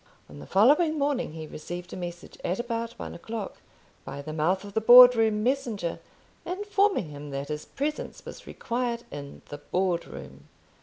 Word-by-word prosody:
On 75 0 -12
the 75 - -10
following 300 - +4
morning 280 - -1
he 160 -1 -7
received 175 +4 -8
a - - -4
message, 175 -1 -7
at 180 - -1
about 230 -1 -3
one - - -6
o'clock, 220 +3 -6 0.5
by - - -7
the 155 +1 -6
mouth 175 +5 +1
of 200 -1 -10
the 220 - +1
Board 245 +2 +10
room 220 -2 +2
messenger, 235 -9 -1 0.4
informing 400 - 0
him 145 0 -9
that 140 +1 -5
his 150 0 -4
presence 300 +2 -4
was - - -10
required 235 0 -3
in 140 -1 -9
the 145 - -7
Board 180 +2 -1
room. - - -11
205 Hz, 170 wpm, -27 LUFS, 160-250 Hz, 0.5 s, Board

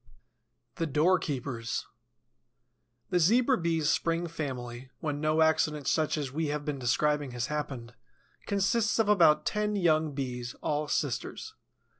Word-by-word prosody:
THE 165 -2 -1
DOORKEEPERS 140 -7 0 1.3
The 180 - +3
Zebra 240 - +4
Bee's 165 -2 0
spring 165 +1 +1
family, 130 -6 -5
when 145 -2 -3
no 155 +1 +3
accident 150 -2 +1
such 155 -1 +1
as 140 -3 -3
we 155 +3 -1
have 145 0 -3
been 145 -3 -3
describing 145 +2 +1
has 120 -1 -2
happened, 130 -6 -4 0.5
consists 205 +2 +1
of 225 -2 +2
about 165 -7 +5
ten 210 0 0
young 160 -5 +2
Bees, 125 -3 -4
all 150 0 -1
sisters. 145 -4 -3
150 Hz, 130 wpm, -29 LUFS, 135-170 Hz, 1.3 s, about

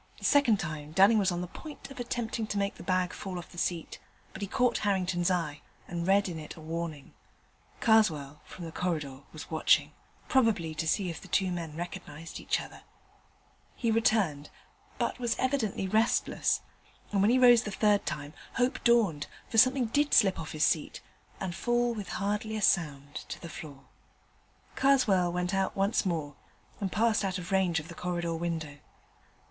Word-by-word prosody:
The - - -7
second 265 -8 +4
time 150 -3 -5
Dunning 200 +5 +6
was 190 -2 +2
on 175 0 -2
the 180 - -4
point 295 - -10
of 270 - -10
attempting 235 -2 -3
to 205 - -3
make 200 0 0
the - - -13
bag 185 -1 0
fall 190 -2 -6
off 175 - -8
the 175 - -8
seat, 170 -2 -2 0.3
but - - -9
he 200 - -2
caught 250 +5 +1
Harrington's 185 -3 +1
eye, 160 -5 -1 0.3
and 170 0 -3
read 200 +1 +4
in 170 -3 -5
it 155 - -8
a - - -12
warning. 160 -2 -5 0.7
Karswell, 155 -11 +3
from 175 - -9
the 165 - -7
corridor, 155 -7 -3
was 155 +1 -10
watching: 160 - +3 0.4
probably 215 -11 +2
to 160 +1 -3
see 180 +2 +1
if 165 - -8
the - - -12
two 190 -2 +1
men 165 -3 -5
recognized 170 -2 -7
each - - 0
other. - - -10 0.9
He 230 -2 0
returned, 205 -10 +1 0.5
but - - -1
was 240 -2 0
evidently 255 -8 0
restless: 220 +4 +1 0.5
and, 200 -2 +2
when 205 - +4
he 250 - +4
rose 245 -2 +7
the 215 - -5
third 205 0 +2
time, 145 0 -5 0.2
hope 250 +2 0
dawned, 215 -11 +3 0.2
for 225 - +3
something 255 +1 +5
did 290 +6 +2
slip 195 -5 +4
off 160 - -6
his 155 -1 +2
seat 155 -3 0 0.4
and 190 -2 -3
fall 240 +5 +1
with 210 -3 -6
hardly 210 +2 -2
a - - -3
sound 145 -6 +1 0.2
to - - -5
the 170 - -8
floor. 145 -4 -9 0.9
Karswell 215 -10 +3
went 180 +2 -2
out 195 0 0
once 195 +1 +1
more, 155 -5 -2 0.5
and 195 -3 -2
passed 220 -1 +2
out 190 -1 -1
of 180 0 -7
range 185 -4 +2
of 150 - -9
the 170 - -9
corridor 175 -1 -2
window. 160 -3 -4
185 Hz, 185 wpm, -29 LUFS, 165-220 Hz, 0.9 s, rose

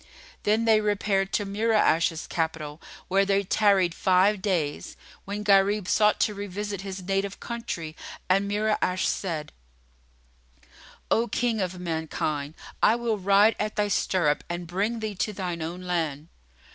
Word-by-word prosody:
Then 220 +2 +1
they 220 -1 +5
repaired 200 -2 0
to 205 - +1
Mura'ash's 200 -6 +2
capital, 160 -3 -3 0.3
where 195 +1 +3
they 200 0 +1
tarried 195 -3 +3
five 190 +3 +3
days, 170 -7 -2 0.3
when 205 +1 -4
Gharib 200 -1 +3
sought 210 -1 +3
to 210 - +2
revisit 200 0 -5
his 190 -1 -6
native 195 +1 -2
country 170 -9 -5 0.3
and 195 +2 +2
Mura'ash 205 -3 0
said, 160 -6 -2 1.6
"O 230 +2 +3
King 230 -1 0
of 180 -1 -3
mankind, 160 -3 -3 0.3
I 225 - +5
will 235 -3 -1
ride 200 +3 +4
at 210 0 -2
thy 205 0 +1
stirrup 175 -6 +1
and 175 0 -4
bring 205 +7 -2
thee 215 -1 -3
to 210 +2 -2
thine 180 -3 -4
own 170 +3 -5
land." 165 -4 -2
195 Hz, 140 wpm, -26 LUFS, 175-210 Hz, 1.6 s, they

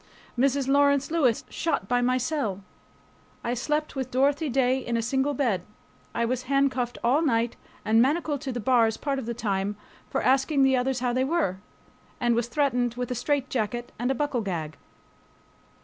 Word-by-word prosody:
Mrs. 270 +1 +1
Lawrence 280 +1 +3
Lewis 270 -9 +2
shot 325 - -2
past 245 +2 +2
my 255 +1 +2
cell. 250 -7 -2 0.8
I 235 - -1
slept 300 +5 -2
with 260 -1 -3
Dorothy 280 +4 +1
Day 260 0 +2
in 240 -2 -2
a - - 0
single 270 +4 0
bed. 235 -9 +1 0.5
I 235 - +1
was 255 +1 -2
handcuffed 265 -3 +1
all 255 +6 +3
night 235 -6 +1 0.3
and 225 +1 +4
manacled 290 +1 +1
to 270 - -3
the 245 - -3
bars 230 -1 +3
part 275 -2 -2
of 240 - -6
the 235 - -3
time 205 -3 -2 0.3
for - - -1
asking 270 +2 +3
the 265 0 +4
others 255 0 0
how 245 -1 0
they 255 +1 +1
were, 275 - 0 0.6
and 240 -1 +2
was 235 0 0
threatened 245 -2 0
with 250 0 -4
a - - -1
straitjacket 245 -3 -1
and 245 +2 0
a 270 - +1
buckle 275 -3 -1
gag. 165 -7 -4
255 Hz, 180 wpm, -26 LUFS, 235-275 Hz, 0.8 s, and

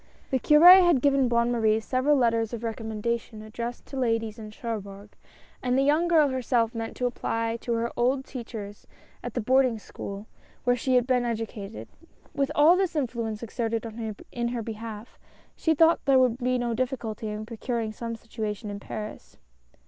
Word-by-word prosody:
The 260 - +2
Cure 345 +8 +8
had 345 -6 +4
given 275 -1 +3
Bonne 235 0 +2
Marie 220 -2 +2
several 260 +6 +1
letters 230 -2 +1
of 235 0 -5
recommendation 220 0 -3
addressed 235 +2 -6
to 275 - -8
ladies 225 -3 -1
in 215 -1 -8
Cherbourg, 205 -2 -7 0.5
and 250 0 +1
the 270 - +3
young 305 +5 +3
girl 315 -4 +4
herself 245 -3 0
meant 225 -1 -5
to 250 - -1
apply 230 -1 -1
to 235 0 -3
her 230 0 -1
old 260 +3 +1
teach 245 -2 -8
ers 205 -1 -8 0.4
at - - -6
the 245 - 0
boarding 255 0 +3
school 200 -1 -8 0.4
where 245 0 +3
sho 255 +2 -1
had 250 -1 +4
been 255 -1 +2
educa 225 -3 -4
ted. - - -9 0.5
With 280 -1 0
all 310 +4 +6
this 370 -2 0
influence 235 -6 -2
exerted 230 0 -2 0.5
in 240 -1 -2
her 235 -1 -3
behalf, 220 0 -8 0.4
she 320 -1 +1
thought 325 +2 +4
there 275 -2 +5
would 250 -2 +3
be 250 0 +1
no 240 -1 -1
difficulty 235 -3 -3
in 210 0 -5
procuring 230 0 -3
some 230 +1 -5
situation 215 -2 -5
in 200 - -6
Paris. 210 +1 -8
235 Hz, 180 wpm, -26 LUFS, 220-260 Hz, 0.5 s, Cure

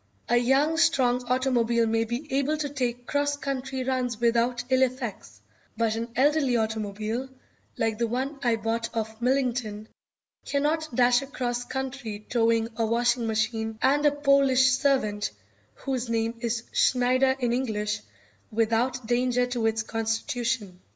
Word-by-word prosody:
A 240 - +3
young, 270 +6 +2
strong 255 -7 +3
automobile 240 -2 +2
may 225 0 +1
be 240 +6 -4
able 280 +3 +1
to 295 -1 -2
take 245 -3 -3
cross 285 +1 0
country 265 -2 -3
runs 250 -3 -1
without 240 +1 +1
ill 260 0 +4
effects, 245 - -2 0.4
but 225 -1 +1
an 230 +1 -3
elderly 280 -2 +3
automobile, 220 +3 -2 0.5
like 225 -1 -1
the 235 - +1
one 265 +5 -3
I 240 -2 +2
bought 225 +1 -2
of 220 0 -4
Millington, 240 -5 0 0.6
cannot 310 +3 0
dash 245 0 +4
across 245 -3 -3
country 255 -6 -5
towing 230 -1 +2
a 225 - +1
washing 235 +1 +1
machine 220 0 -1
and 285 +4 +3
a 295 - +5
Polish 275 -2 +4
servant, 250 -6 +1 0.5
whose 255 -3 -3
name 225 0 0
is 230 -1 -2
Schneider 255 +1 +3
in 245 -3 0
English, 210 -4 -1 0.5
without 230 +3 0
danger 245 +1 +1
to 245 -2 -1
its 225 0 0
constitution. 225 -2 -2
245 Hz, 140 wpm, -26 LUFS, 225-265 Hz, 0.6 s, a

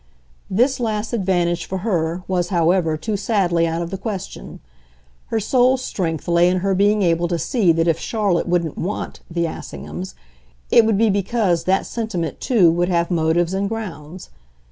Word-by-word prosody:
This 255 +7 +2
last 220 -1 -2
advantage 175 -5 0
for 190 - -3
her, 175 -4 -1
was, 180 -2 0
however, 170 -2 +2
too 210 +7 -3
sadly 185 -5 +1
out 165 +1 -2
of 170 - -7
the 195 - -4
question; 200 -3 -6 0.7
her 225 - -1
sole 255 +4 +3
strength 175 - -3
lay 170 +1 +4
in 180 0 0
her 195 - +2
being 205 +2 +3
able 170 0 +2
to 170 0 -1
see 205 - +2
that 165 +1 +1
if 165 -1 +2
Charlotte 205 -7 0
wouldn't 170 -3 -1
"want" 195 +5 -4
the 170 0 -1
Assinghams 80 - -7 0.6
it 230 - +6
would 220 -3 +2
be 220 0 +3
because 200 -3 0
that 190 +1 +2
sentiment 195 - -4
too 195 -10 +4
would 175 +2 0
have 170 0 0
motives 170 +1 +1
and 195 +1 -1
grounds. 185 -6 -7
180 Hz, 170 wpm, -20 LUFS, 170-210 Hz, 0.7 s, it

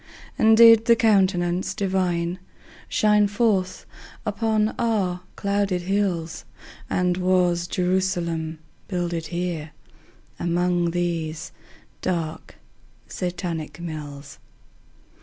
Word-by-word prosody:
And 220 0 +5
did 230 -1 +8
the 235 - +6
Countenance 190 -5 +2
Divine 185 -2 -1 0.5
Shine 210 -1 +3
forth 200 -3 0 0.4
upon 215 +1 0
our 200 -6 0
clouded 200 -3 0
hills? 175 -4 -1 0.5
And 180 -1 +1
was 180 -2 +2
Jerusalem 175 -3 -1 0.3
builded 175 -3 -2
here 170 -2 -4 0.7
Among 175 0 +1
these 165 -2 -3 0.5
dark 165 -3 -3 0.5
Satanic 175 -4 -4
mills? 145 -4 -7
180 Hz, 85 wpm, -24 LUFS, 170-200 Hz, 0.7 s, did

